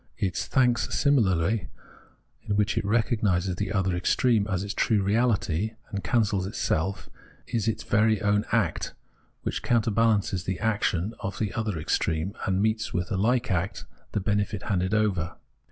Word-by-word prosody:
Its 95 -3 -1
thanks 125 -3 +2
similarly, 105 - +2 0.7
in 100 - -2
which 105 +1 +1
it 115 - 0
recog 110 +2 +1
nises 95 -2 +1
the 100 -1 -2
other 95 -3 +1
extreme 105 +4 +2
as 95 -1 -1
its 100 0 -4
true 105 -4 +2
reahty, 105 -2 +1 0.2
and 100 0 -4
cancels 105 -6 +1
itself, 95 -1 -1 0.4
is 115 -2 -2
its 110 - -1
own - - -21 0.3
very - - -10 0.3
act, - - 0 0.5
which - - -2
counterbalances 110 -5 +1
the 95 -1 -2
action 105 -2 0
of 100 - -4
the 105 -4 -2
other 110 -6 -2
extreme, 80 +3 -1
and 95 0 +1
meets 110 0 0
with 90 +1 -2
a - - +1
hke 120 +5 +1
act 90 +2 -2 0.3
the - - +1
benefit 105 0 -1
handed 95 -1 0
over. 95 -6 0
100 Hz, 155 wpm, -26 LUFS, 95-110 Hz, 0.7 s, thanks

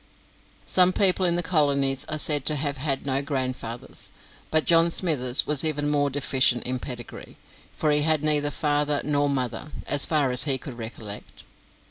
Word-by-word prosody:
Some 185 0 +4
people 185 -1 +3
in 170 - +1
the 175 - 0
colonies 140 -5 +1
are 155 - -4
said 145 -1 +3
to 155 - +2
have 145 -1 -2
had 135 0 -2
no 135 0 -1
grandfathers; 130 -4 -5 0.4
but 155 0 +1
John 165 0 +4
Smithers 145 -8 +1
was 150 0 -1
even 150 -2 0
more 145 -1 +1
deficient 130 -3 +1
in 130 0 -3
pedigree, 120 -2 -9 0.4
for 155 - 0
he 150 0 +3
had 155 -1 +1
neither 150 -1 +1
father 145 -1 0
nor 145 -1 +1
mother, 135 +2 -3
as 145 -1 +3
far 145 -5 +1
as 125 +3 +2
he 135 -3 +2
could 125 -2 -10
recollect. 110 -2 -8
145 Hz, 170 wpm, -24 LUFS, 130-155 Hz, 0.4 s, Some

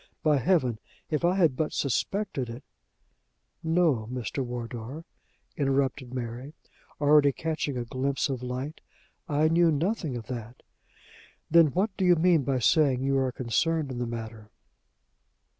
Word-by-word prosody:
By 150 -2 +4
Heaven! 130 - +1 0.3
if 155 +2 0
I 175 +2 +3
had 165 -9 +3
but 155 +2 -1
suspected 140 - -1
it 115 +1 -8 0.6
" - - -48 0.2
"No, 130 -11 +2
Mr. 125 +2 -3
Wardour," 120 +4 -6 0.5
interrupted 135 -2 0
Mary, 125 +3 -5 0.5
already 145 -1 +5
catching 155 -2 -3
a 120 - -3
glimpse 135 +3 -1
of 130 -3 -3
light, 130 +5 -5 0.5
"I 150 +1 +3
knew 165 +1 +4
nothing 160 - -1
of 115 - -7
that." 120 0 -7 0.9
"Then 165 -1 +7
what 190 +7 -1
do 190 - +1
you 180 -1 +6
mean 170 -1 +4
by 135 0 0
saying 130 +1 +3
you 135 0 +2
are 130 -1 0
concerned 145 +5 0
in 125 - -5
the 120 - -2
matter?" 110 -2 -7
135 Hz, 145 wpm, -27 LUFS, 125-155 Hz, 0.9 s, Then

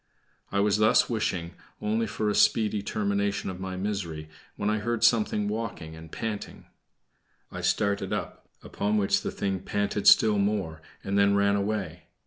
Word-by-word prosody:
I 100 - +1
was 105 0 +2
thus 110 +3 +4
wishing 95 -7 -2 0.3
only 110 +2 0
for 105 +1 -2
a 105 - +1
speedy 105 -1 +3
termination 100 -1 -1
of 90 - -9
my 95 -1 -5
misery, 90 -6 -4 0.3
when 100 - -3
I 105 0 +1
heard 115 +1 -2
something 105 -3 +3
walking 105 -7 -4
and 80 0 -12
panting. 110 -3 -5 0.9
I - - -6
started 100 -1 0
up, - - -5
upon 105 +1 -1
which 100 -2 +2
the - - -3
thing 95 -1 -2
panted 100 +1 -2
still 105 -2 +6
more, 100 -6 -1 0.2
and 100 +1 0
then 100 0 +4
ran 100 0 +3
away. 100 -5 -3
100 Hz, 160 wpm, -27 LUFS, 95-105 Hz, 0.9 s, still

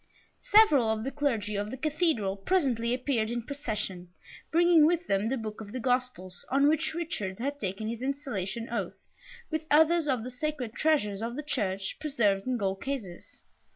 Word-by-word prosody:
Several 310 - +6
of 220 0 -1
the 270 - -3
Clergy 230 -8 -1
of 205 +1 -2
the 260 - -6
Cathedral 300 - 0
presently 235 - +1
appeared 250 -3 0
in 240 0 -3
procession, 215 -10 -4 0.4
bringing 335 -2 +6
with 345 +1 +1
them 195 -3 +1
the 265 +3 0
book 220 -2 -6
of 205 -2 -9
the 255 - -3
Gospels 250 -7 -2
on 275 +2 +4
which 315 +1 +1
Richard 260 - -3
had 280 +4 -3
taken 195 +1 -3
his 230 +1 -4
installation 235 -5 -3
oath, 195 -4 -3 0.5
with 315 0 -2
others 320 +1 +4
of 255 -5 0
the 250 - -6
sacred 255 -3 -3
treasures 225 -12 +1
of 235 +1 -3
the 300 - -4
Church, 195 -9 -2
preserved 215 -9 +1
in 255 -1 +1
gold 195 -3 -2
cases. 230 -11 -6
245 Hz, 175 wpm, -29 LUFS, 210-295 Hz, 0.5 s, Several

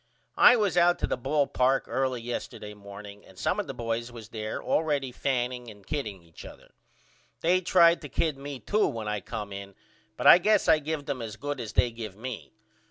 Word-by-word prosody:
I 245 - +9
was 205 -7 +1
out 175 0 +5
to - - 0
the - - -1
ball 140 +4 +1
park 130 0 +2
early 130 -2 -1
yesterday 115 -3 -6
morning 100 0 -11
and 95 - -18
some 185 - 0
of 205 - -3
the - - -5
boys 115 0 -3
was 115 -2 -11
there 110 -2 -4
allready 145 -5 0
fanning 125 -2 -2
and 105 -2 -14
kidding 110 - -4
each 80 -1 -14
other. - - -13 0.7
They 180 +3 +3
tried 170 -1 +5
to 145 - -8
kid 155 +2 0
me 140 0 -7
to 210 +1 +2
when 110 -2 -4
I 105 -1 -2
come 105 -3 -6
in 100 0 -8 0.4
but - - -4
I - - +10
guess 210 +2 +3
I 155 - +6
give 155 -1 -4
them 140 -3 -3
as 110 -2 -6
good 145 -1 -4
as 115 -3 -6
they 120 - +3
give 110 -4 -7
me. 125 0 -7
125 Hz, 210 wpm, -27 LUFS, 110-150 Hz, 0.7 s, I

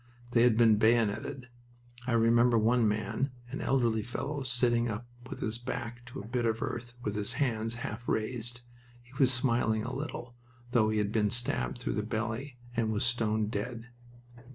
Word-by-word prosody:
They 115 - +4
had 120 -2 +5
been 110 -3 +6
bayoneted. 115 +4 +2 0.6
I 125 - +1
remember 115 +1 +5
one 115 +1 +4
man, 110 +5 -1 0.2
an 140 - -4
elderly 120 -5 +2
fellow 140 +6 -4
sitting 120 -2 +2
up 110 +2 -4 0.2
with - - -7
his 110 +1 -1
back 120 -1 -5
to 120 - -8
a 100 - -7
bit 120 +1 -1
of 115 0 0
earth 120 +1 -5
with 105 - -1
his 105 -1 -2
hands 115 -4 0
half 115 +3 -6
raised. 120 +1 -2 0.4
He 125 +1 -20
was 130 -2 +5
smiling 115 -3 +2
a 125 +3 -4
little, 130 -3 -5 0.4
though 110 -3 +4
he 110 - 0
had 105 -1 +1
been 105 -2 +2
stabbed 120 +2 0
through 120 - -2
the 105 - 0
belly 115 +5 -3 0.2
and 115 -2 +1
was 105 +2 0
stone 110 -2 +1
dead. 115 +3 -4
115 Hz, 175 wpm, -31 LUFS, 110-125 Hz, 0.6 s, been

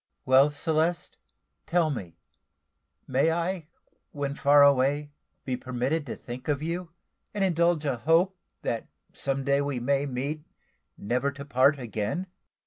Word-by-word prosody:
"Well, 135 +3 +6
Celeste, 160 +3 -1 0.5
tell 165 -3 +2
me, 95 - -6 0.9
may 135 +5 +2
I, 170 0 -2 0.4
when 140 -1 -3
far 145 0 +5
away, 140 +1 +3 0.3
be 130 - -1
permitted 130 +5 -2
to - - -4
think 125 +1 -9
of 145 -1 0
you, 170 +2 -3 0.5
and 200 - +1
indulge 170 -3 +2
a 135 -4 0
hope 165 +8 +3 0.3
that 115 - -2 0.3
some 135 0 -2
day 140 +1 +2
we 140 -3 -2
may 140 +3 +1
meet 140 +4 -3 0.5
never 125 +6 0
to 140 0 -8
part 140 +1 +4
again?" 115 - -3
140 Hz, 135 wpm, -27 LUFS, 130-160 Hz, 0.9 s, Well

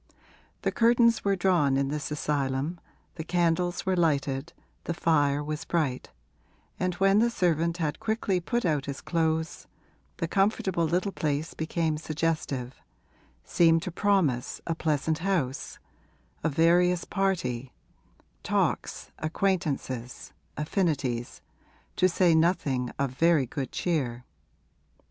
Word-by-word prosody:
The - - +1
curtains 235 0 +4
were 200 -1 +2
drawn 175 -8 +2
in 135 0 0
this 150 0 -3
asylum, 145 +2 -1 0.4
the 160 - -4
candles 175 +1 0
were 190 -1 +1
lighted, 145 -3 0 0.3
the 170 - -2
fire 145 -3 +2
was 155 +1 -4
bright, 150 -8 -1 0.7
and 185 -1 0
when 195 +2 +4
the 235 +2 +4
servant 170 -5 +1
had 155 -4 -2
quickly 215 -4 0
put 235 +6 -1
out 150 -5 0
his 140 -1 -4
clothes 160 -1 -1 0.5
the 165 - -2
comfortable 195 -2 +1
little 180 +5 0
place 150 -2 -2
became 160 -1 -1
suggestive 155 -5 -2 0.6
seemed 165 -1 +3
to 185 - -4
promise 170 -10 +1
a 165 - -1
pleasant 155 -1 0
house, 165 -8 -2 0.7
a 160 - +2
various 175 +3 +3
party, 135 - -1 0.7
talks, - - -1
acquaintances, 155 -8 -2 0.2
affinities, 150 - -1 0.6
to 185 - +4
say 175 -1 +3
nothing 150 -7 +1
of 140 -2 -1
very 155 +1 +3
good 135 +4 -5
cheer. 140 -9 -2
165 Hz, 120 wpm, -27 LUFS, 140-180 Hz, 0.7 s, curtains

